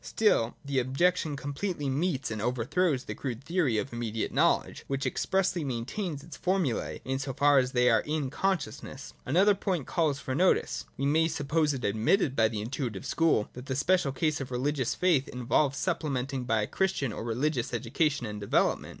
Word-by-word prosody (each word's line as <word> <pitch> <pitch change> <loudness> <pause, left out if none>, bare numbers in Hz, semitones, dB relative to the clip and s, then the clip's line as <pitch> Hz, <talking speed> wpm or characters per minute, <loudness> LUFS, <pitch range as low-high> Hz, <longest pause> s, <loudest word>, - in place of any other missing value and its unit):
Still, 165 - +2
the 140 -1 0
objection 150 +4 +1
completely 145 +3 -3
meets 135 -2 -1
and 110 -2 -3
overthrows 125 - 0
the 105 - -5
crude 125 +2 -5
theory 160 -7 +1
of 130 +4 -3
immediate 115 -2 -3
know - - +4
ledge, - - -11
which 135 0 -2
expressly 180 +5 0
maintains 140 - -3
its 165 - -10
formulae 180 -10 -1
in 135 0 -1
so 135 0 -3
far 145 +1 +5
as 130 0 0
they 125 0 +3
are - - +5
in 150 -3 -2
consciousness. 140 - -3
— - - -33
Another 190 +9 +5
point 190 -7 -2
calls 155 -4 +1
for 130 - -4
notice. 180 +7 +2
We 135 - -1
may 160 +3 +3
suppose 155 -1 0
it 125 - -4
admitted 115 - +2
by 115 -2 +4
the 110 -1 -4
intuitive 115 -3 -4
school, 165 -10 +2
that 125 +2 -9
the 130 - -2
special 155 +1 +2
case 150 +2 0
of 135 - -5
religious 130 0 -1
faith 170 -7 +2
involves 130 +3 +1
supplementing 135 -4 -2
by 110 -2 +1
a - - -3
Christian 190 - -1
or - - -5
religious 125 +3 -1
education 130 +3 0
and 105 -1 -6
development. 100 - +1
135 Hz, 185 wpm, -29 LUFS, 125-160 Hz, -, far